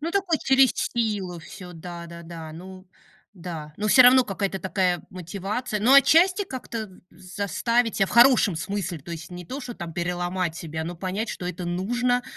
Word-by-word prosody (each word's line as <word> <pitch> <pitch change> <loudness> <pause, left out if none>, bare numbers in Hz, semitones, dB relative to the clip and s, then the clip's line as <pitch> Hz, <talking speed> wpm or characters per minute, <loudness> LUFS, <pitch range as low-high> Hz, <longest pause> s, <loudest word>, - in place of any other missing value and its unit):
Ну, 325 +3 -3
такой 370 -4 +1
через 265 -2 +4
силу 205 -7 -2
всё, 180 +2 -11
да-да-да. 170 -1 -9
Ну 185 +3 -11 0.5
да, 165 -4 -7
но 215 +1 -2
всё 255 +4 +8
равно 250 0 +7
какая-то 195 -1 -3
такая 180 -1 0
мотивация 200 +6 -4
но 245 +5 +4
отчасти 350 +8 +6
как-то 240 - -6 0.2
з 185 +1 -14
заставить 230 +3 0
себя 195 - +2
в - - -10
хорошем 240 -7 +5
смысле, 185 0 -3
то 155 +4 -12
есть 165 +1 -8
не 175 0 -8
то, 265 - -6
что 245 -2 -7
там 170 -1 -7
переломать 175 0 -2
себя, 160 -1 -5
но 175 +1 -6
понять, 190 +6 -3
что 180 - -5
это 180 0 -5
нужно 240 +8 0
190 Hz, 175 wpm, -25 LUFS, 175-240 Hz, 0.5 s, всё